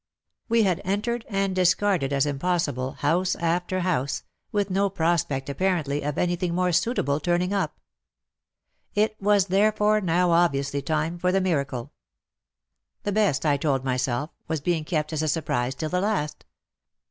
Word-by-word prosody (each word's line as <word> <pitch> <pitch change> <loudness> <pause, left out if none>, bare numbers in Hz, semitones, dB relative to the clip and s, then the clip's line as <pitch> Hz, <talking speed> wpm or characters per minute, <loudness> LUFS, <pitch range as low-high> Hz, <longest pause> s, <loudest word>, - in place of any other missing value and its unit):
We 230 -1 +4
had 185 -4 +1
entered 220 +5 -2
and 195 -2 0
discarded 180 -4 +2
as 140 0 +2
impossible, 145 -3 -1
house 175 +6 +1
after 175 +2 -1
house, 150 -7 -1 0.3
with 200 -2 0
no 200 +1 +2
prospect 160 -7 0
apparently 150 -2 0
of 145 0 -3
anything 175 -1 0
more 180 0 +2
suitable 155 - +1
turning 175 +4 0
up. 200 - -1 1.2
it 215 +1 +2
was 205 -1 +4
therefore 210 +2 +3
now 175 -1 +2
obviously 140 -5 +2
time 160 +3 -1
for 180 +1 +1
the 195 - +3
miracle. 140 -9 -2 1.1
The 205 - -1
best, 200 -8 +1
I 145 -2 +3
told 140 -2 0
myself, 130 +2 -1 0.2
was 160 -1 -1
being 160 +1 -1
kept 155 -2 -1
as 155 - 0
a 155 - 0
surprise 135 -5 -1
till 155 - -3
the 180 +2 0
last. 150 -8 -2
175 Hz, 150 wpm, -25 LUFS, 145-190 Hz, 1.2 s, We